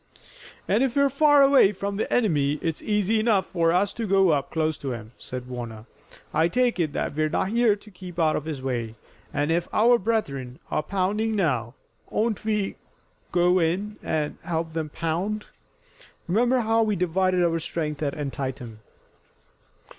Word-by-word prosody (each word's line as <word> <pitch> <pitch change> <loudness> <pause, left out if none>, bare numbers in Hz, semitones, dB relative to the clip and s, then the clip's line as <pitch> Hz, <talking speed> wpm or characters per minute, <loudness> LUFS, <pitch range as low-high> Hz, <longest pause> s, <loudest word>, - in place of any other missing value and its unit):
"And 210 +4 +2
if 265 -2 +1
we're 280 -1 +3
far 290 0 +5
away 275 -7 +6
from 200 +1 -4
the - - -2
enemy 150 - +2
it's 165 -2 -2
easy 210 +1 +1
enough 215 -4 +2
for 165 -2 +1
us 185 +3 +1
to 230 -2 -4
go 195 -1 +4
up 140 -2 0
close 155 -1 0
to 135 -3 -3
him," 110 -2 -8
said 125 -1 -7
Warner. 120 -3 -7 0.5
"I 160 +2 +3
take 245 +3 +1
it 155 -4 0
that - - -2
we're 155 +1 0
not 185 +4 0
here 230 -1 +3
to 210 +1 -16
keep 180 -2 -10
out 160 -2 +2
of 150 - -3
his 150 -5 -5
way, 120 -4 -3 0.4
and, 145 +2 0
if 170 +1 0
our 235 +2 +4
brethren 140 - -2
are - - +1
pounding 200 +6 -1
now, 125 - 0 0.3
oughtn't 220 -1 -1
we 210 -2 0
to - - -21 0.6
go 180 +1 +3
in 190 +6 -1
and 150 -2 -2
help 165 -1 -3
them 160 -2 -3
pound? 175 +8 -2 0.8
Remember 240 +7 +2
how 225 0 +2
we 215 -2 +1
divided 180 +1 +1
our 165 -1 +1
strength 155 -2 -4
at 145 -2 -1
Antietam." 130 -6 -5
175 Hz, 175 wpm, -25 LUFS, 150-215 Hz, 0.8 s, away